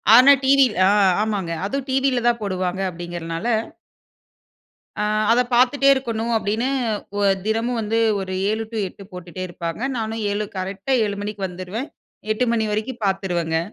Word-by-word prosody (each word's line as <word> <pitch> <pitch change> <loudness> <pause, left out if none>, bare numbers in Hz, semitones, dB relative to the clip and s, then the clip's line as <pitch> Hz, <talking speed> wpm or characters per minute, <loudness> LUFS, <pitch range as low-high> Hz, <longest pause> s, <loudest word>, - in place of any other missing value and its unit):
ஆனா 260 +4 +9
டிவி 275 0 +6 0.2
ஆ - - +4 0.3
ஆமாங்க. 200 -6 -2
அதுவும் 275 +6 -3
டிவில 260 -2 +1
தான் 235 -1 +2
போடுவாங்க, 185 -1 -2
அப்படிங்கிறனால 170 +2 -5 1.5
"அ - - 0 0.3
அதை 245 +2 +4
பாத்துட்டே 260 +3 +3
இருக்கணும்." 235 -3 -2
அப்படீன்னு, 220 +4 -1 0.5
ஒ - - 0 0.2
தினமும் 230 +2 0
வந்து 220 +1 0 0.2
ஒரு 190 -1 -4 0.2
7 220 +1 -1
டூ 225 - -4
8 195 - -12
போட்டுட்டே 180 0 -7
இருப்பாங்க. 170 +2 -5 0.2
நானும் 220 0 -3
7, 210 +1 -1
கரெக்ட்‌டா 195 +7 -2
7 205 -1 -3
மணிக்கு 205 -1 -4
வந்துருவேன். 185 - -6 0.4
எட்டு 215 +4 +1
மணி 225 -1 +1
வரைக்கும் 220 +4 -3
பாத்துருவேங்க. 175 -4 0
215 Hz, 145 wpm, -22 LUFS, 185-240 Hz, 1.5 s, ஆனா